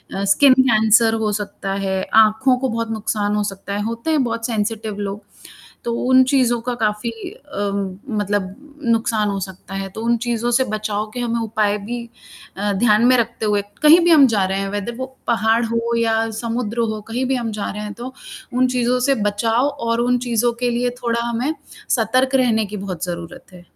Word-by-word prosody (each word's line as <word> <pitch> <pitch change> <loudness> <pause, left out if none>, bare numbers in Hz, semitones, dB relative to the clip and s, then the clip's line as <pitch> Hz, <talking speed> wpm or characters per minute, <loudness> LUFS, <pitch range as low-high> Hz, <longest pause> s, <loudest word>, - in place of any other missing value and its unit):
अ, 195 - -2
skin 275 +1 +6
cancer 225 -2 +4
हो 210 - +1
सकता 195 -1 -5
है, 190 0 -1 0.2
आँखों 250 +5 +2
को 260 +1 -1
बहुत 230 0 -3
नुकसान 210 -1 -1
हो 210 - +1
सकता 200 +1 -8
है, 205 - -2
होते 230 +7 -3
हैं 300 -4 +3
बहुत 230 -1 -3
सेंसिटिव 220 -2 -3
लोग। 200 +1 -6 0.6
तो 235 - -1
उन 260 0 +6
चीज़ों 255 -3 +2
का 245 +1 -3
काफ़ी 210 +2 0 0.2
अ, 205 - -5 0.5
मतलब 200 -2 -2 0.3
नुकसान 225 -2 +1
हो 195 - -2
सकता 190 0 -8
है, 195 0 -4
तो 220 +4 -8
उन 235 0 +2
चीज़ों 240 0 -1
से 260 +2 +3
बचाव 215 0 -2
के 250 - -5
हमें 235 -1 -1
उपाय 215 -2 0
भी 240 0 -4 0.5
अ, 205 +1 -1
ध्यान 215 +2 +3
में 255 +1 +6
रखते 230 -1 -1
हुए 205 -1 +2 0.2
कहीं 310 +3 +8
भी 345 - +4
हम 290 -4 +7
जा 205 -5 +1
रहे 190 +1 -1
हैं 195 - -2
वेदर 205 +4 -4
वो 260 - -3 0.2
पहाड़ 225 0 +2
हो 230 +1 -1
या 225 -1 +1
समुद्र 235 -1 -3
हो 215 - -6
कहीं 250 +3 -1
भी 265 +1 0
हम 235 -3 -2
जा 205 -1 -4
रहे 210 +1 -6
हैं, 210 0 -6
तो 245 +4 -8 0.4
उन 255 +1 +3
चीज़ों 250 0 +1
से 275 - +3
बचाव 225 +5 +1
और 235 -5 -1
उन 245 0 +2
चीज़ों 235 0 +2
के 245 - +2
लिए 245 +1 0
थोड़ा 235 0 0
हमें 235 0 -2 0.5
सतर्क 255 +3 +2
रहने 230 -5 +2
की 210 +1 -7
बहुत 185 -3 -5
ज़रूरत 170 +1 -8
है। 180 - -12
230 Hz, 200 wpm, -20 LUFS, 210-245 Hz, 0.6 s, कहीं